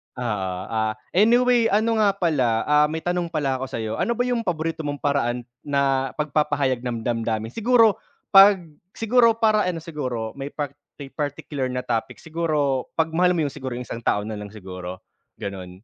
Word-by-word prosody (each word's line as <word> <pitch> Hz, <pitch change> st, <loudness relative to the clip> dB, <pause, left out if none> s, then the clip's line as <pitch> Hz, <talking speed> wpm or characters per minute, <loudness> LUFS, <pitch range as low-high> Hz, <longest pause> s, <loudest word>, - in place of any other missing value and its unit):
Oo, 100 Hz, -7 st, -2 dB
ah, 110 Hz, -1 st, 0 dB, 0.2 s
anyway 235 Hz, +4 st, +4 dB
ano 220 Hz, +1 st, +2 dB
nga 200 Hz, -2 st, +3 dB
pala, 130 Hz, -11 st, +1 dB
ah, 150 Hz, 0 st, +4 dB
may 160 Hz, +1 st, -5 dB
tanong 175 Hz, -1 st, -1 dB
pala 145 Hz, -5 st, -1 dB
ako 135 Hz, -, -4 dB
sayo, 115 Hz, -4 st, -4 dB
ano 235 Hz, -, +1 dB
ba 245 Hz, -, +1 dB
yung 245 Hz, -3 st, -1 dB
paborito 165 Hz, -2 st, -2 dB
mong 145 Hz, -2 st, -4 dB
paraan 125 Hz, -4 st, 0 dB, 0.2 s
na 140 Hz, -2 st, +1 dB
pag-papahayag 145 Hz, -4 st, 0 dB
ng 120 Hz, -2 st, -4 dB
damdamin? 115 Hz, -2 st, -2 dB
Siguro, 225 Hz, -, +4 dB, 0.3 s
pag, 200 Hz, 0 st, +9 dB, 0.4 s
siguro 230 Hz, 0 st, +4 dB
para 215 Hz, -3 st, +2 dB
ano 165 Hz, -3 st, -3 dB
siguro 125 Hz, -9 st, -4 dB
may 135 Hz, -, -4 dB
par 145 Hz, -3 st, -3 dB, 0.5 s
particular 145 Hz, -2 st, -3 dB
na 125 Hz, 0 st, -3 dB
topic 115 Hz, -3 st, -2 dB
siguro 155 Hz, -5 st, 0 dB
pag 160 Hz, 0 st, +1 dB
mahal 180 Hz, +2 st, +3 dB
mo 165 Hz, -, +1 dB
yung 145 Hz, -, -1 dB
siguro 130 Hz, -2 st, -6 dB
yung 125 Hz, -, -5 dB
isang 115 Hz, -, -6 dB
tao 105 Hz, -3 st, 0 dB
na 105 Hz, 0 st, -5 dB
lang 105 Hz, -, -7 dB
siguro 95 Hz, -3 st, -8 dB, 0.3 s
ganun. 95 Hz, -1 st, -8 dB
145 Hz, 175 wpm, -23 LUFS, 120-180 Hz, 0.5 s, pag